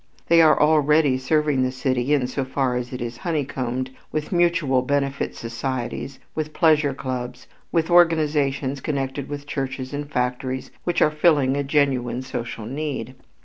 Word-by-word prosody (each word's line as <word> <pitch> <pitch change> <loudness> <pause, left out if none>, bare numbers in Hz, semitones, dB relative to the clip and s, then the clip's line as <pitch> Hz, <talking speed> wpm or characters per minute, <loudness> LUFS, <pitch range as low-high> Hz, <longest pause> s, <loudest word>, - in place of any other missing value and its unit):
They 165 0 +7
are 155 -1 +5
already 150 -2 +4
serving 150 0 +1
the 130 0 +1
city 130 0 -1
in 140 -4 +3
so 130 +2 -2
far 130 -1 -1
as 125 0 -3
it 125 -1 -5
is 120 0 -6
honeycombed 130 -5 -2 0.2
with 155 -1 -3
mutual 170 -7 +2
benefit 140 +1 -1
societies, 120 +3 -4 0.2
with 155 -1 -4
"pleasure 155 -5 +3
clubs," 125 -2 -5 0.3
with 165 0 +1
organizations 150 -5 +3
connected 135 -1 -3
with 145 -1 -6
churches 135 -2 -4
and 145 0 -4
factories 130 0 -2
which 175 - +2
are 155 - +3
filling 150 -4 +3
a 145 - 0
genuine 135 -4 +1
social 120 -4 -5
need. 135 -2 -4
135 Hz, 150 wpm, -23 LUFS, 130-150 Hz, 0.3 s, They